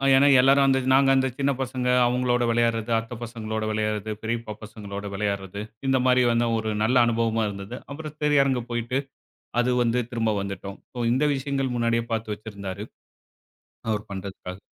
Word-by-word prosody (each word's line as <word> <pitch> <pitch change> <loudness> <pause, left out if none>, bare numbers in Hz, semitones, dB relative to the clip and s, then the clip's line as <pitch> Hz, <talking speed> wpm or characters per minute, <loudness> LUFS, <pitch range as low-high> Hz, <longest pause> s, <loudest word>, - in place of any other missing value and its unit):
ஏன்னா, 135 +2 +6
எல்லாரும் 135 0 +5 0.2
நாங்க 135 0 +5
அந்த 130 0 +3
சின்ன 140 0 +2
பசங்க 125 -1 -2 0.2
அவங்களோட 125 0 +1
விளையாட்றது, 115 -1 +1
அத்த 115 +2 -8
பசங்களோட 110 -2 -4
விளையாட்றது, 110 0 -1
பெரியப்பா 115 -1 -3
பசங்களோட 100 -2 -7
விளையாட்றது, 100 -1 -3 0.3
இந்தமாரி 130 -1 +4
வந்து 120 0 +2
ஒரு 110 0 -2
நல்ல 120 +4 +2
அனுபவமா 115 -1 +1
இருந்தது. 100 +4 -7
அப்புறம் 155 +1 -7
திரையரங்கு 140 -4 +3
போயிட்டு, 120 +2 -1 0.6
அது 125 +1 +1
வந்து 120 +1 +1
திரும்ப 115 -2 0
வந்துட்டோம். 100 0 -6
சோ, - - -11
இந்த 130 +4 +2
விஷயங்கள் 135 -1 -2
முன்னாடியே 115 -1 +1
பார்த்து 110 -1 -2
வச்சிருந்தாரு. 100 -2 -7 1.0
அவரு 105 -1 0
பண்றதுக்காக. 95 -1 -7
115 Hz, 145 wpm, -25 LUFS, 105-130 Hz, 1.0 s, ஏன்னா